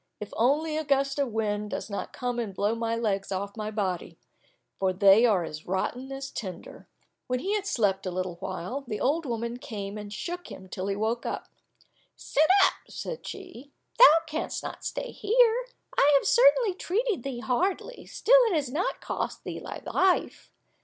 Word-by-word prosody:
If 210 - -7
only 300 +6 +2
a 315 - -1
gust 275 -1 +1
of 280 - +2
wind 210 -1 -1
does - - -4
not 200 -2 -5
come 245 -1 -3
and 210 -5 -4
blow 205 +3 +1
my 230 0 -1
legs 200 -4 -1
off 200 +1 -3
my 215 -1 -4
body, 195 -5 -3 0.6
for 190 -1 +2
they 200 +5 +6
are 195 -6 +2
as 155 -1 -8
rotten 245 +8 -2
as 270 0 -5
tinder." 190 -5 -7 0.4
When 255 - 0
he 390 +11 -2
had 410 -2 -1
slept 195 - +1
a - - -2
little 185 -1 -3
while, 240 +11 -5
the 215 -3 -3
old 300 +3 +1
woman 235 0 -3
came 210 -6 -6
and 205 -1 -8
shook 350 - -5
him 190 - -10
till 185 +1 -4
he 200 - 0
awoke. 220 +3 -1 0.9
"Sit 310 +3 +1 0.2
up," - - +2 0.2
said 485 - -6
she, 355 -9 -9 0.3
"thou 330 -10 +10
canst 315 0 -4
not - - -7
stay - - -4
here; 475 +2 +3 0.3
I 285 - +5
have - - -2
certainly - - +5
treated 395 - -1
thee 250 -2 -5
hardly, 370 - -1
still - - +5
it 430 -6 +1
has 280 -5 -1
not 325 +7 -1
cost - - -4
thee - - -5
thy - - -8
life. 375 -1 +1
245 Hz, 180 wpm, -27 LUFS, 205-325 Hz, 0.9 s, thou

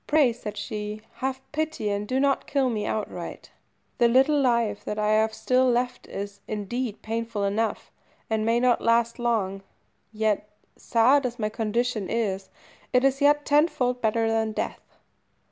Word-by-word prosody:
"Pray," 295 -6 +4
said 210 -3 -7
she, 210 +1 -5
"have 265 0 -2
pity, 310 -8 -2
and 205 +1 -2
do 260 +3 0
not 275 0 +1
kill 270 -3 +1
me 210 -2 -2
outright. 215 - -5 0.5
The 240 - +6
little 270 +5 +4
life 235 -5 +1
that 210 - -4
I 210 0 +1
have 220 +1 +3
still 255 +3 +2
left 245 +1 -1
is, 200 0 -6
indeed, 215 +2 -4
painful 225 -1 -3
enough, 210 +2 -1 0.4
and 220 -1 0
may 230 +2 +2
not 250 -1 +3
last 235 +1 +2
long; 210 -5 0 0.5
yet, 215 -1 0 0.3
sad 255 +5 +3
as 245 -1 -3
my 215 -3 -1
condition 225 -1 -1
is, 195 -4 -1 0.4
it 250 0 +3
is 270 +1 +2
yet 290 +1 +4
tenfold 280 -5 +2
better 225 +1 +1
than 225 -1 0
death." - - -5
230 Hz, 160 wpm, -26 LUFS, 215-255 Hz, 0.5 s, The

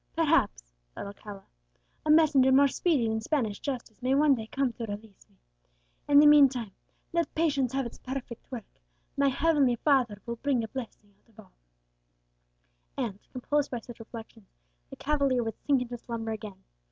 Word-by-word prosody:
"Perhaps," - - +1 0.2
thought - - -6
Alcala, 200 0 -10 0.6
"a - - 0
messenger 300 -4 +5
more 280 +2 +6
speedy 275 -4 +1
than 220 0 -1
Spanish 220 -5 -1
justice 250 -5 -6
may 255 +2 +1
one 295 0 +5
day 225 -4 -4
come 270 0 -1
to 230 - -5
release 205 -1 -10
me. - - -30 0.7
In 285 - +5
the 295 - +8
meantime 270 -7 +5 0.4
let 340 -1 0
patience 285 -6 +1
have 270 -1 0
its 235 - -9
perfect 255 -2 -7
work, 235 -5 -6 0.5
my 280 0 +2
heavenly 275 -2 +2
Father 245 -6 +1
will 235 -1 -5
bring 265 -2 0
a - - -4
blessing 220 -4 -9
out - - -34
of 220 - -22
all;" 205 - -16 1.4
and, 225 -7 -3
composed 290 +3 -1
by 245 - -3
such 240 +1 -12
reflections, 225 -2 -11 0.4
the - - -9
cavalier 280 -4 +1
would 225 -1 -5
sink 275 -3 +3
into 240 -1 -8
slumber 225 -1 -5
again. 210 -3 -8
250 Hz, 170 wpm, -28 LUFS, 220-280 Hz, 1.4 s, the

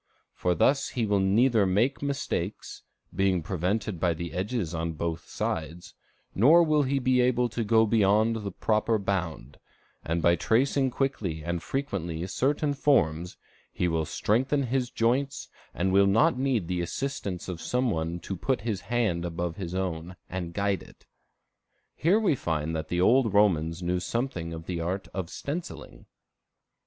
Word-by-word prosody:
For 90 -1 0
thus 135 - +2
he 115 - +2
will 100 -1 +2
neither 105 +2 +3
make 110 +9 +1
mistakes, 135 -9 -3 0.3
being 95 -2 +1
prevented 95 +3 -2
by 85 -1 +1
the 85 +1 -6
edges 95 -1 -2
on 80 0 -2
both 80 +1 -4
sides, 85 +4 -4 0.4
nor 155 - +6
will 155 -2 +3
he 140 0 0
be 130 -1 +2
able 125 -1 +2
to 115 +1 -2
go 110 +1 +4
beyond 110 +1 +3
the 100 -2 -5
proper 110 +4 +1
bound; 90 - -3 0.4
and 80 +2 -1
by 85 0 +5
tracing 130 +6 +2
quickly 110 - -2
and 85 +1 -2
frequently 90 - -3
certain 145 - 0
forms, 90 - +1 0.3
he 90 - -1
will 80 -2 0
strengthen 130 - +1
his 125 0 -1
joints, 130 +5 0 0.2
and 95 +1 -1
will 100 0 +5
not 110 +4 +4
need 125 -8 0
the 90 -1 -1
assistance 100 -2 -4
of 90 -3 -5
some 125 -1 0
one 80 0 -2
to 95 - -5
put 130 +7 -1
his 105 -3 -3
hand 110 -8 0
above 85 -1 -3
his 90 -3 -5
own, 90 -1 -3
and 85 -2 -5
guide 100 -1 0
it." - - -17 0.9
Here 180 +8 +3
we 210 -8 +2
find 80 - -2
that 80 0 -3
the 90 - -1
old 115 +1 +4
Romans 85 -4 +2
knew 90 +1 0
something 90 -4 -3
of 80 0 -7
the 85 -1 -3
art 95 +4 -3
of 95 -3 -4
stenciling. 160 - -7
100 Hz, 160 wpm, -27 LUFS, 85-125 Hz, 0.9 s, nor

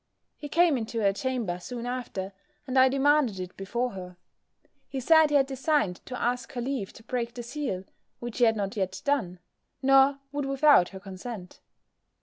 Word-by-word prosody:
He 290 - -8
came 330 -3 +3
into 230 +1 -4
her 200 -1 +3
chamber 230 -6 -2
soon 240 +5 -6
after, 235 -6 -4 0.3
and 260 - -4
I 260 0 +6
demanded 275 -6 +2
it 180 0 -6
before 235 +6 -2
her. 180 -2 -9 0.7
He 270 - -3
said 315 +3 +5
he 295 - +1
had 275 -1 +5
designed 270 - 0
to 250 -1 -5
ask 245 0 -1
her 245 - -3
leave 250 -5 -3
to 225 - -15
break 235 0 -3
the 240 - -5
seal, 245 -7 -4 0.3
which 240 0 -6
he 245 - +6
had 225 -1 +3
not 200 -2 -3
yet 190 -1 -3
done; 220 -11 0 0.4
nor 270 +1 +5
would 290 -1 -2
without 275 -9 +5
her 190 - -9
consent. 190 0 -8
245 Hz, 180 wpm, -27 LUFS, 195-275 Hz, 0.7 s, I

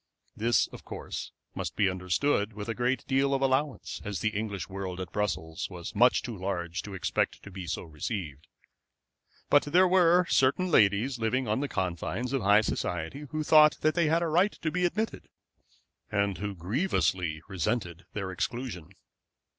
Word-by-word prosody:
This, 115 +2 +3
of - - -11
course, - - -6 0.2
must - - -4
be 100 - +3
understood 100 +5 0
with 105 0 -6
a 115 - -1
good 125 +3 0
deal 135 +1 +2
of 135 - -1
allowance, 135 +1 0
as 100 -2 -3
the 110 - +1
English 105 -2 -3
world 95 -2 -5
at 90 -3 -5
Brussels 90 -5 -2
was 90 -2 -7
much 125 +4 +4
too 120 - -5
large 90 -2 -3
to 100 -2 -8
expect 95 - -1
to 100 - -10
be 95 -2 -7
so - - -3
received; 80 - -5 1.0
but 145 - +7
there 180 +5 +5
were 180 -1 +5
certain 165 +8 +2
ladies 110 +3 +3
living 120 +3 0
on 105 +3 +1
the 145 - -1
confines 95 - -2
of 135 - +1
high 105 +1 +5
society 105 - -3
who 155 0 -2
thought 150 0 +6
that 155 - +3
they 170 -3 +2
had 165 +2 +2
a - - 0
right 180 +6 +3
to 155 - 0
be 180 +2 +1
admitted, 215 +5 -2 0.8
and 100 -2 0
who 100 -1 -3
grievously 90 - 0
resented 95 -2 -2
their 95 -3 -3
exclusion. 95 -3 -4
105 Hz, 170 wpm, -29 LUFS, 95-140 Hz, 1.0 s, but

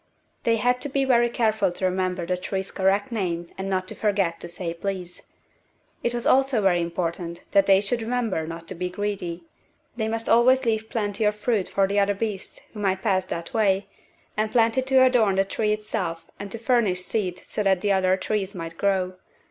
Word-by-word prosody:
They 230 - +2
had 245 +3 +1
to 285 - -4
be 275 0 +1
very 240 -2 +4
careful 220 -5 +1
to 185 - -2
remember 185 -1 -1
the 180 +1 0
tree's 190 +1 -4
correct 195 +5 +1
name 175 -6 -2
and 190 0 -4
not 185 -1 -1
to - - -3
forget 195 -5 0
to - - -7
say 170 0 -4
"please." 180 0 -5 0.7
It 235 - 0
was 240 - -3
also 265 -2 +4
very 185 -4 +3
important 170 0 -3
that 200 -1 +4
they 195 0 +6
should 230 +4 -1
remember 225 -8 -1
not 165 0 -7
to - - -3
be 180 0 -3
greedy. 180 -3 -4 0.5
They 220 -2 -1
must 225 +1 -1
always 250 +3 +5
leave 220 -1 0
plenty 210 -3 -2
of 210 0 +2
fruit 210 -2 0
for 195 - +2
the 200 +1 +1
other 200 0 +2
beasts 205 -2 -4
who 215 - -8
might 190 -2 0
pass 190 -4 +1
that 170 0 -5
way, 200 -3 +2 0.5
and 215 0 0
plenty 230 +1 +3
to 260 0 +4
adorn 230 -6 +3
the 195 0 +3
tree 210 +2 0
itself 200 -6 -3
and 200 0 -7
to - - -3
furnish 225 -6 +1
seed 185 -3 -2
so 210 - -5
that 195 -1 +2
other 190 -2 +3
trees 200 0 -2
might 165 -1 -7
grow. 185 -2 0
200 Hz, 200 wpm, -25 LUFS, 185-225 Hz, 0.7 s, they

